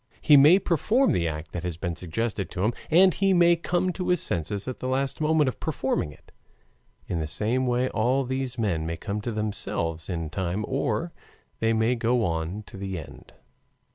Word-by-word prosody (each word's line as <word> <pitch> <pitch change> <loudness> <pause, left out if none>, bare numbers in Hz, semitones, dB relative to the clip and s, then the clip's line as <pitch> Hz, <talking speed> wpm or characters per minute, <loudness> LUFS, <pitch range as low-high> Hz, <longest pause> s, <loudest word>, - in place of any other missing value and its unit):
He 150 - +6
may 150 +6 +8
perform 210 - +2
the 85 -2 +1
act 75 0 -5
that 90 - -4
has 90 -2 -4
been 85 -1 -3
suggested 95 +4 -3
to 90 - -3
him, 110 +3 +2 0.2
and 185 +3 +6
he 195 -1 +2
may 175 0 +5
come 180 +2 -1
to 180 - -4
his 180 0 +3
senses 95 +6 -2
at 130 - -5
the 130 +1 -1
moment 155 -1 +3
of 130 - -3
performing 130 - -1
it. - - -19 0.7
In 85 - -2
the 80 - -2
same 115 +10 0
way 125 +1 +1
all 125 +5 +1
these 130 0 -3
men 85 -8 -1
may 85 0 -3
come 100 +4 -4
to 120 - -3
themselves 100 -6 -2
in 80 -3 -3
time 95 +3 -2
or - - -1 0.5
they 115 0 +2
may 110 +2 +2
go 120 -1 +1
on 85 +5 -3
to 100 - -12
the 95 -1 -4
end. 80 - -11
115 Hz, 195 wpm, -26 LUFS, 90-135 Hz, 0.7 s, may